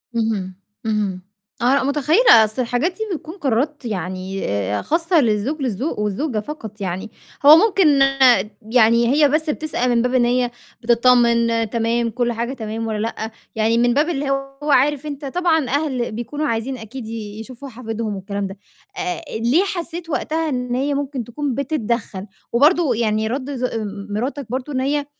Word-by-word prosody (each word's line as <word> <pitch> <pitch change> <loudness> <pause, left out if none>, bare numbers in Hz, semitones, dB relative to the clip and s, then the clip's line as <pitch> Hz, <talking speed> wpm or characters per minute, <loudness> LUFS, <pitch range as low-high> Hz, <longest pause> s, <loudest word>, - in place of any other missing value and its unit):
اهم، 215 -5 -1 0.3
اهم، 210 -4 -1 0.4
آه، 250 +3 +4
لأ 280 - +2
متخيلة، 295 - +5
أصل 215 +4 -2
الحاجات 245 +8 0
دي 360 - -22 0.2
بتكون 320 +1 -8
قرارات 280 - -1
يعني 185 -1 -4
آآ 100 0 -1
خاصةً 330 0 +2
للزوج 235 +7 0
للزو 255 - -2
والزوجة 210 +4 -1
فقط 220 -4 -8
يعني، 190 +3 -4 0.3
هو 295 +2 +11
ممكن 390 -2 +4 0.8
يعني 235 0 +5
هي 295 -1 +5
بس 310 +2 0
بتسأل 300 -5 -1
من 235 -1 +3
باب 250 +1 0
إن 245 -2 +4
هي 245 0 +1 0.3
بتطمن 235 -1 +3
تمام، 230 +1 0
كلّ 240 +1 -1
حاجة 235 +2 -3
تمام 225 -2 -4
والّا 215 -1 -2
لأ، 225 0 -4 0.2
يعني 225 +1 +2
من 240 0 +3
باب 295 +5 +2
اللي 285 -4 -2
هو 275 +2 -2
عارف 285 +2 +3
أنت 290 -1 -6
طبعًا 320 -1 +1
أهل 270 -4 -1
بيكونوا 240 +7 -3
عايزين 235 +3 -2
أكيد 225 +1 -8
ي 215 -2 -6
يشوفوا 255 +4 -9
حفيدهم 225 -3 -4
والكلام 200 +1 -4
ده، 195 +1 -9 0.4
آآ 360 -3 -3 0.2
ليه 250 - +3
حسّيت 345 -3 -5
وقتها 320 +1 -1
إن 250 -2 -2
هي 280 +3 0
ممكن 275 -2 -3
تكون 255 +3 -3
بتدّخل 235 -8 -2 0.3
وبرضه 295 +2 +4
يعني 220 -1 0
رد 260 +4 -3
ز 250 0 -1 0.4
مراتك 255 +6 -3
برضه 260 +4 -4
إن 260 - 0
هي 285 +2 0
245 Hz, 165 wpm, -20 LUFS, 225-290 Hz, 0.8 s, هو